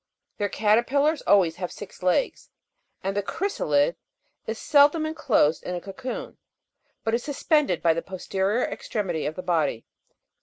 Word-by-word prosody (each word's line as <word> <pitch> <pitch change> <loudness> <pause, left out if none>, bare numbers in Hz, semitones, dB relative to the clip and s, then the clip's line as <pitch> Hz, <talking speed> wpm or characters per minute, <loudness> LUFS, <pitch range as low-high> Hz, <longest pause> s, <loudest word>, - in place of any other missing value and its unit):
Their 205 -1 0
caterpillars 250 +10 +2
always 175 -5 +4
have 180 -1 -4
six 205 - -10
legs, 185 - 0 0.5
and 195 +1 -2
the 205 - +1
chrysalid 170 - 0 0.5
is 220 0 -3
seldom 295 +4 +4
enclosed 275 - +2
in 180 - -4
a - - -3
cocoon, 200 +8 -7 0.6
but 225 - -1
is 240 +1 0
suspended 290 - +1
by 165 -1 +5
the 165 - -2
posterior 190 +5 -1
extremity 180 -8 -3
of 155 - -4
the 185 - -6
body. 165 -10 0
200 Hz, 145 wpm, -25 LUFS, 180-265 Hz, 0.6 s, by